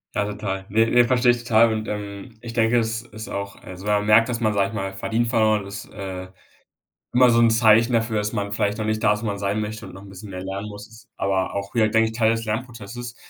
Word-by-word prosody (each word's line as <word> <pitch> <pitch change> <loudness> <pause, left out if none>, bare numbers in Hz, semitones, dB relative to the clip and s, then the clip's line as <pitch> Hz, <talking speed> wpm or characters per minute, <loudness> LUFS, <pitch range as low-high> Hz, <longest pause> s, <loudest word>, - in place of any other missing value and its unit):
Ja, 105 - +1
total. 100 -2 -4
Ne, 115 +3 +3
ne, 120 +1 +5
verstehe 125 0 +4
ich 120 - -1
total. 115 -1 +4
Und, 110 0 -4
ähm, 105 +2 -6
ich 115 -1 -8
denke, 115 +1 +3
es 115 0 -2
ist 110 -2 -10
auch 100 0 -5
also, 95 +2 -10
wenn 105 - +2
man 105 0 +1
merkt, 110 +3 +5
dass 120 -1 -2
man, 110 -3 +1
sage 100 -1 +1
ich 110 - -11
mal, 95 -2 -3
verdient 115 +4 -1
verloren 110 -3 +2
ist, 100 +1 -7
äh, 95 -2 -6 0.9
immer 125 0 +6
so 115 0 +4
'n 115 -1 +5
Zeichen 115 +1 +4
dafür, 115 -1 +1
dass 105 +2 -2
man 100 -2 -2
vielleicht 105 0 0
noch 110 - -3
nicht 110 +1 -1
da 105 - +5
ist, 105 - -5
wo - - -2
man 100 -1 -2
sein 100 +2 -1
möchte, 105 0 -5
und - - -11
noch 95 - -11
'n 100 - -12
bisschen 100 +2 -10
mehr 90 -1 -6
lernen 100 +2 -5
muss, 110 +3 -12
aber 95 -1 -1
auch 100 +2 -4
wieder, 110 -2 +3
denke 110 +1 +3
ich, 110 - -9
Teil 110 -1 +3
des 115 0 -2
Lernprozesses, 120 +1 -5
110 Hz, 260 wpm, -23 LUFS, 100-115 Hz, 0.9 s, immer